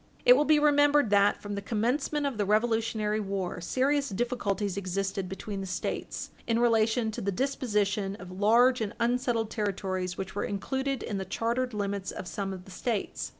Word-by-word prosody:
It 245 Hz, -, +10 dB
will 295 Hz, +3 st, +3 dB
be 310 Hz, 0 st, +5 dB
remembered 290 Hz, -4 st, +4 dB
that, 200 Hz, 0 st, +4 dB
from 205 Hz, 0 st, -4 dB
the 200 Hz, -, -3 dB
commencement 250 Hz, +7 st, 0 dB
of 265 Hz, -6 st, -2 dB
the -, -, +3 dB
Revolutionary 220 Hz, -1 st, +1 dB
war, 195 Hz, -3 st, -3 dB
serious 275 Hz, +9 st, +1 dB
difficulties 205 Hz, -3 st, -1 dB
existed 195 Hz, 0 st, -2 dB
between 195 Hz, +1 st, -5 dB
the 190 Hz, -, -5 dB
States 180 Hz, -, -4 dB, 0.2 s
in 230 Hz, -1 st, +2 dB
relation 225 Hz, -1 st, +2 dB
to -, -, -5 dB
the 200 Hz, -, -1 dB
disposition 210 Hz, -5 st, 0 dB
of 180 Hz, -3 st, -10 dB
large 230 Hz, +6 st, +4 dB
and 210 Hz, -2 st, -3 dB
unsettled 235 Hz, -2 st, 0 dB
territories 190 Hz, -3 st, -2 dB
which 190 Hz, 0 st, -5 dB
were 205 Hz, -, -2 dB
included 265 Hz, +6 st, -2 dB
in 200 Hz, -3 st, -3 dB
the 190 Hz, -, -4 dB
chartered 235 Hz, +4 st, -1 dB
limits 200 Hz, -1 st, -2 dB
of 180 Hz, -, -6 dB
some 195 Hz, 0 st, -3 dB
of 185 Hz, -1 st, -8 dB
the 190 Hz, -, -13 dB
States. 215 Hz, +2 st, -3 dB
215 Hz, 180 wpm, -29 LUFS, 195-245 Hz, 0.2 s, It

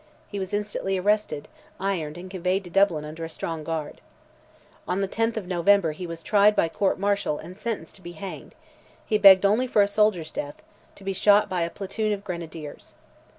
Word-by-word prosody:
He 200 Hz, -, -4 dB
was 190 Hz, 0 st, -4 dB
instantly 205 Hz, -2 st, -2 dB
arrested, 200 Hz, -6 st, 0 dB, 0.3 s
ironed, 175 Hz, -6 st, -2 dB
and 180 Hz, +1 st, -8 dB
conveyed 185 Hz, +1 st, -1 dB
to 175 Hz, -, -11 dB
Dublin 185 Hz, -6 st, +3 dB
under 155 Hz, +2 st, -7 dB
a 165 Hz, -, -5 dB
strong 165 Hz, -1 st, -5 dB
guard. 155 Hz, -1 st, -4 dB, 0.9 s
On 180 Hz, +2 st, 0 dB
the 195 Hz, -, 0 dB
10th 225 Hz, +3 st, -1 dB
of 210 Hz, -, -3 dB
November 180 Hz, -1 st, +3 dB
he 175 Hz, +4 st, -7 dB
was 165 Hz, -1 st, -7 dB
tried 210 Hz, 0 st, +4 dB
by 165 Hz, -, +2 dB
court 195 Hz, +4 st, 0 dB
martial 200 Hz, -6 st, 0 dB
and 175 Hz, +4 st, -10 dB
sentenced 210 Hz, -6 st, -5 dB
to -, -, -19 dB
be 175 Hz, -1 st, -9 dB
hanged: 190 Hz, +4 st, -8 dB, 0.5 s
he 215 Hz, -, +1 dB
begged 195 Hz, -1 st, +8 dB
only 220 Hz, +6 st, +3 dB
for 210 Hz, -4 st, +4 dB
a -, -, +1 dB
soldier's 205 Hz, -6 st, +1 dB
death—"to 145 Hz, +6 st, -9 dB
be 195 Hz, 0 st, -2 dB
shot 205 Hz, +2 st, +4 dB
by 180 Hz, -2 st, -1 dB
a 170 Hz, -, 0 dB
platoon 205 Hz, +3 st, -2 dB
of 200 Hz, -1 st, -5 dB
grenadiers." 165 Hz, -5 st, -8 dB
190 Hz, 195 wpm, -25 LUFS, 165-205 Hz, 0.9 s, begged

